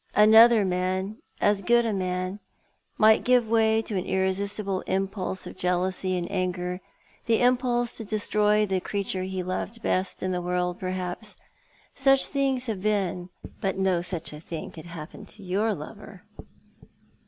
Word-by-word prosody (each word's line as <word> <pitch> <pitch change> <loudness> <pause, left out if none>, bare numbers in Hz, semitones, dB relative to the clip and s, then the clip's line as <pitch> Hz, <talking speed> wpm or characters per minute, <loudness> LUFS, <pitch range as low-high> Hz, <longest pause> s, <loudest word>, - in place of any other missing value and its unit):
Another 220 +1 +7
man 185 +3 -1
— - - -28
as 205 -1 +1
good 235 +4 +3
a 225 - 0
man 185 +1 -2 0.3
— - - -41 0.2
might 215 0 +5
give 250 -2 +3
way 220 0 +3
to 210 - -4
an 185 - 0
irresistible 190 +1 -1
impulse 190 0 -2
of - - -8
jealousy 185 +1 0
and 175 - -2
anger 180 -1 -2 0.2
— - - -33
the 230 -1 +3
impulse 245 -1 +2
to 225 - -3
destroy 210 0 +2
the 190 -2 0
creature 195 0 -3
he 185 0 -3
loved 210 +5 -4
best 185 +1 -1
in 185 - -1
the 180 -1 -1
world, 180 0 -1
i^erhaps. 185 +3 -4 0.6
Such 270 0 +4
things 270 -3 0
have 215 -6 -3
been. 190 -4 -1 0.3
But 195 -1 -1
no 190 -2 +1
such 175 -3 -4
a 150 - -8
thing 165 0 -7
could 160 +1 -11
happen 170 +4 -9
to 210 - -11
your 200 +5 0
lover." 195 +4 -10
195 Hz, 165 wpm, -26 LUFS, 185-220 Hz, 0.6 s, Another